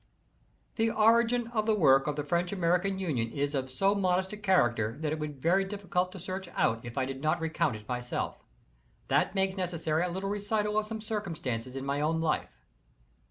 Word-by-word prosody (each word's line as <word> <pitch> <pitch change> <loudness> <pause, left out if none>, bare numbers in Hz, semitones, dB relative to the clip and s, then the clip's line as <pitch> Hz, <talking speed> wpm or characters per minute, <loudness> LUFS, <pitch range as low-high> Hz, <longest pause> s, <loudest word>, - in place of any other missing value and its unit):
IS - - -38
The 225 0 +3
origin 230 +2 +4
of 220 -2 -1
the 220 - +4
work 135 -7 +5
of 150 - 0
the 150 - -2
French 170 +4 0
American 180 +1 +1
Union 135 -12 -1
is 145 +1 -1
of 130 -2 -2
so 195 +10 +2
modest 190 -1 +1
a - - -5
character 120 - +2
that 155 -1 -1
it 155 - -4
would 150 -1 -3
be - - -19
very 175 +7 +3
difficult 190 -2 -2
to 190 - -8
search 185 +1 -5
it - - -14
out 115 0 +2
if 120 +2 -8
I 130 - +2
did 135 0 -6
not 155 +2 +1
recount 160 -7 0
it 105 0 -11
myself. 125 -1 -3 0.7
That - - +2
makes 190 0 +1
necessary 165 -4 -1
a 180 - -1
little 190 +3 -3
recital 210 +1 0
of 215 - -4
some 220 0 -5
circumstances 155 - -4
in 135 0 -4
my 140 +1 -1
own 160 +2 +1
life. 155 - -2
175 Hz, 210 wpm, -30 LUFS, 140-200 Hz, 0.7 s, work